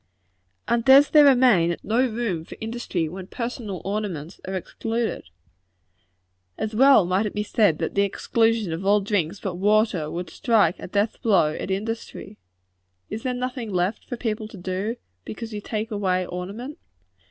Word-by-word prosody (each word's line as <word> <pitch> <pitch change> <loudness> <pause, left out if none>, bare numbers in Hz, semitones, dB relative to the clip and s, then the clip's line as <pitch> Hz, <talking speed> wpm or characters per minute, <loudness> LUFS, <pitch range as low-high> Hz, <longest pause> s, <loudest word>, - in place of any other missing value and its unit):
And 235 -1 +1
does 270 +3 +7
there 300 -1 +7
remain 240 -11 +4
no 225 +3 0
room 215 -8 -2
for - - -11
industry 220 -7 -3
when 185 +3 -8
personal 230 -5 -5
ornaments 195 -5 -4
are 190 - -3
excluded? 225 - -3 1.3
As 220 0 -3
well 265 -3 +6
might 185 +4 +1
it - - -7
be 210 - 0
said 205 -6 +2
that - - -3
the 200 - +2
exclusion 225 -1 +1
of 165 +4 -4
all 205 +1 +4
drinks 195 -2 -1
but 185 -3 -4
water, 205 -5 +2
would 175 +1 -5
strike 210 -7 +2
a - - -7
death 205 +4 -1
blow 190 -9 +3
at - - -5
industry. 210 0 -5 0.7
Is 220 - -4
there 250 0 -2
nothing 250 -3 -4
left 180 +3 -1
for 245 - -4
people 220 -2 -3
to 215 - -12
do, 190 +5 -3 0.3
because 225 0 -7
you 210 - -4
take 220 +2 -4
away 185 -3 0
ornament? 205 - -6
210 Hz, 165 wpm, -24 LUFS, 185-230 Hz, 1.3 s, does